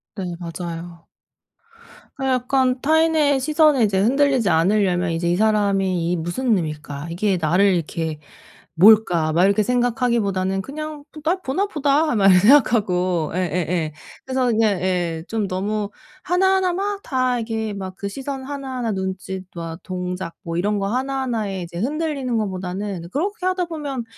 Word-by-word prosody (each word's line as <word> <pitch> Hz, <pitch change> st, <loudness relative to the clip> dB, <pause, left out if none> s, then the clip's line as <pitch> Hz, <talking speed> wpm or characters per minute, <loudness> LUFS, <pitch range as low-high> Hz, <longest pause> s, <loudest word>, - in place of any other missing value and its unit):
네 180 Hz, -4 st, -4 dB
맞아요. 170 Hz, 0 st, -7 dB, 1.1 s
아 270 Hz, -, -3 dB
약간 255 Hz, 0 st, +1 dB
타인의 315 Hz, -2 st, +3 dB
시선에 300 Hz, -2 st, +3 dB
이제 195 Hz, -2 st, +2 dB
흔들리지 260 Hz, -2 st, +2 dB
않으려면 180 Hz, 0 st, +2 dB
이제 170 Hz, +1 st, 0 dB
'이 175 Hz, -, +2 dB
사람이 195 Hz, -5 st, +1 dB
이 -, -, +1 dB
무슨 210 Hz, +9 st, 0 dB
의미일까? 150 Hz, -2 st, -5 dB
이게 190 Hz, +2 st, 0 dB
나를 180 Hz, +5 st, +3 dB
이렇게 160 Hz, -2 st, -3 dB, 0.6 s
뭘까?' 175 Hz, -4 st, +5 dB
막 175 Hz, +3 st, +3 dB
이렇게 200 Hz, +2 st, +3 dB
생각하기보다는 225 Hz, -6 st, 0 dB
'그냥 305 Hz, +2 st, -7 dB, 0.2 s
날 360 Hz, +4 st, +1 dB
보나 360 Hz, +9 st, 0 dB
보다.' 300 Hz, -3 st, +1 dB
막 200 Hz, -3 st, +3 dB
이렇게 185 Hz, -1 st, +7 dB
생각하고 185 Hz, -, +3 dB
예예예. 175 Hz, -2 st, -1 dB, 0.3 s
그래서 260 Hz, -1 st, 0 dB
그냥 215 Hz, -5 st, +2 dB
예. 175 Hz, -3 st, -1 dB
좀 220 Hz, -3 st, -1 dB
너무 205 Hz, +2 st, -2 dB, 0.3 s
하나하나 380 Hz, 0 st, +2 dB
막 400 Hz, +2 st, -2 dB
다 255 Hz, -3 st, 0 dB
이게 220 Hz, -1 st, -3 dB
막 190 Hz, -1 st, -6 dB
그 200 Hz, -, -4 dB
시선 270 Hz, +3 st, -6 dB
하나하나 260 Hz, -5 st, -4 dB
눈짓 190 Hz, 0 st, -4 dB
막 165 Hz, 0 st, -6 dB
동작 180 Hz, -2 st, -5 dB
뭐 165 Hz, 0 st, -4 dB
이런 205 Hz, +4 st, 0 dB
거 195 Hz, -, -1 dB
하나하나에 240 Hz, -5 st, -2 dB
이제 170 Hz, 0 st, -7 dB
흔들리는 275 Hz, -, -2 dB
거보다는 190 Hz, -2 st, -4 dB
그렇게 370 Hz, +6 st, -2 dB
하다 370 Hz, -1 st, +1 dB
보면 290 Hz, -7 st, -5 dB
210 Hz, 325 characters per minute, -21 LUFS, 180-265 Hz, 1.1 s, 이렇게